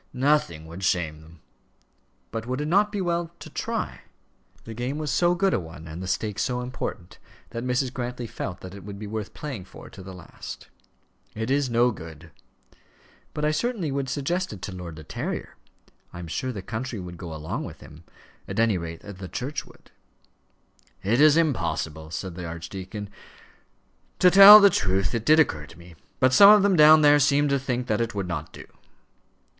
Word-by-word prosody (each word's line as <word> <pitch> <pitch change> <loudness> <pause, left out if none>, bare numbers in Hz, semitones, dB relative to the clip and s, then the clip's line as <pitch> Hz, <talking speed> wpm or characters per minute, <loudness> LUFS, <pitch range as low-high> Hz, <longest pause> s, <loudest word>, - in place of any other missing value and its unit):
"Nothing 125 - +1
would 85 +4 -9
shame 80 -4 -1
them." 80 0 -17 0.9
"But 115 +1 -5
would 130 +2 -2
it 150 - -2
not 205 +5 +3
be 205 -2 -2
well 170 -1 -1
to - - -11
try?" - - -4 0.6
The 115 - -8
game 125 +5 -3
was 155 -2 -3
so 175 0 +2
good 190 +2 +1
a - - +1
one, 80 -2 -10
and 80 +3 -7
the 95 - -5
stake 105 +2 -2
so 125 -1 -1
important, 125 -7 -6 0.3
that 115 - -5
Mrs. 125 +1 -1
Grantly 125 -1 -4
felt 105 -5 -6
that 95 0 -9
it 100 - -10
would 100 0 -8
be 105 - -7
worth 105 0 -6
playing 130 -11 -6
for - - -13
to 95 - -11
the 95 0 -10
last. 90 -3 -10 0.7
"It 110 +3 -3
is 140 -1 +1
no 120 +1 +3
good." 80 -4 -11 1.0
"But 150 - -1
I 150 - +2
certainly 190 - -2
would 135 -1 -2
suggest 170 +7 -2
it 100 -4 -10
to - - -5
Lord 90 -3 -8
De 80 - -10
Terrier. - - -5 0.6
I - - -10
am 85 - -7
sure 130 +10 -3
the 100 -6 -7
country 115 +1 -5
would 90 -1 -8
go 85 -2 -8
along 80 0 -5
with - - -10
him; 75 +3 -14 0.4
at - - -4
any 115 -5 +2
rate 85 -1 -7
the 95 -2 -9
Church 135 +3 -4
would." - - -20 1.1
"It 115 +7 +2
is 155 0 +6
impossible," 80 - -1
said 90 +3 -5
the 85 0 -7
archdeacon. 95 +5 -7 1.1
"To 180 - +5
tell 200 +2 +11
the 200 -1 +6
truth, 95 - 0
it 115 -1 -3
did 155 +1 +6
occur 75 - +1
to 80 - -15
me. 85 0 -14 0.3
But 130 0 +3
some 200 +9 +9
of 210 -1 +7
them 200 -2 +3
down 155 -1 +7
there 145 0 +6
seemed 145 +1 +3
to 140 - +2
think 125 -2 -2
that 110 -2 0
it 115 -1 -3
would 100 -2 -3
not 80 -3 -5
do." - - -11
115 Hz, 195 wpm, -25 LUFS, 90-145 Hz, 1.1 s, tell